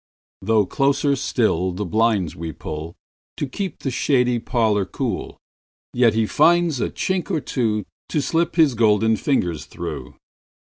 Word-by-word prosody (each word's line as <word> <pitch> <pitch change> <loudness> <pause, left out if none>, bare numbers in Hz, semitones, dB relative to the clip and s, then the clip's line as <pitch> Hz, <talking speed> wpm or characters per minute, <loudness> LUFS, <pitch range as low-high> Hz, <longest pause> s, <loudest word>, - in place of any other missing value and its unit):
Though 105 +1 +2
closer 140 +5 +1
still 95 -9 0
the 105 +3 -3
blinds 105 -3 +1
we 80 0 -5
pullTo 80 - -8
keep 195 +2 -4
the 135 - -1
shady 125 -2 +2
parlour 110 -4 +1
cool, 95 - -4 0.6
Yet 120 -3 +3
he 115 - +2
will 110 - 0
find 175 0 +4
a 130 -5 -2
chink 190 0 -2
or 170 -5 0
twoTo 110 -7 -1 0.3
slip 165 +4 0
his 155 -6 +4
golden 110 -1 +3
fingers 90 - -1
through. 75 -7 -7
115 Hz, 140 wpm, -22 LUFS, 95-140 Hz, 0.6 s, find